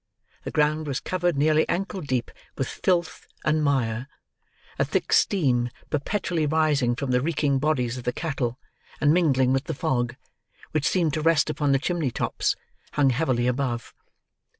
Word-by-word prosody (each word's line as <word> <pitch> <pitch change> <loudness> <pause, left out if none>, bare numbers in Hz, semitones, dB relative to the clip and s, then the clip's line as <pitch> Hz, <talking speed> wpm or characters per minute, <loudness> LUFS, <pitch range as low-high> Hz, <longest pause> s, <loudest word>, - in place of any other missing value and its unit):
The - - -2
ground 150 +1 +1
was 135 -2 -1
covered, 175 -4 -1
nearly 155 +2 +3
ankle 195 +2 -2
deep, 130 -5 -2 0.3
with 135 - -1
filth 175 -3 -1 0.2
and 155 0 +2
mire; 125 -4 0 0.7
a - - +4
thick - - -1
steam, 125 -11 +3 0.2
perpetually 160 +1 -1
rising 145 -5 +2
from 130 +1 -3
the 125 0 +3
reeking 145 -2 +1
bodies 130 -4 0
of - - -9
the 125 - 0
cattle, 130 -5 -2 0.4
and 150 0 +4
mingling 135 -7 +3
with 135 +2 0
the 160 - -3
fog, 120 -2 -1 0.6
which 155 0 +1
seemed 170 -6 +1
to 155 - -1
rest 160 -1 +3
upon 145 -1 0
the 135 - +5
chimney 160 0 -1
tops, - - -1 0.4
hung 140 -2 +3
heavily 125 -3 +1
above. 125 -2 -1
145 Hz, 160 wpm, -25 LUFS, 125-160 Hz, 0.7 s, the